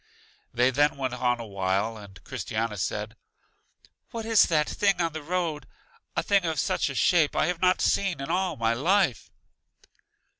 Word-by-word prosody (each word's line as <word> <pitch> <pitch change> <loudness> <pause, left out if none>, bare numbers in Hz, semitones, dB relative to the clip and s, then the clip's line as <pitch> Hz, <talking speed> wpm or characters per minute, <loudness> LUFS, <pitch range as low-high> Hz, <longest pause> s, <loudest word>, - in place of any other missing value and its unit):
They 125 +2 +2
then 145 +2 +2
went 130 -2 -2
on 125 -1 0
a 115 - -6
while, 100 +2 -1
and 100 -3 -13
Christiana 110 -3 -3
said, 105 +3 -3 0.9
What 230 -1 -6
is 225 -2 +5
that 150 -3 +1
thing 200 -2 +1
on 165 -2 0
the 155 - -5
road? 165 -1 -3 0.5
A - - 0
thing 200 -2 +2
of 160 -4 -1
such - - 0
a 140 - -6
shape 160 +1 +3
I - - +2
have 175 0 -2
not 185 0 +3
seen 190 -7 +1
in 135 +4 -4
all 180 -1 0
my 115 0 +1
life! 165 - +1
145 Hz, 175 wpm, -26 LUFS, 115-180 Hz, 0.9 s, is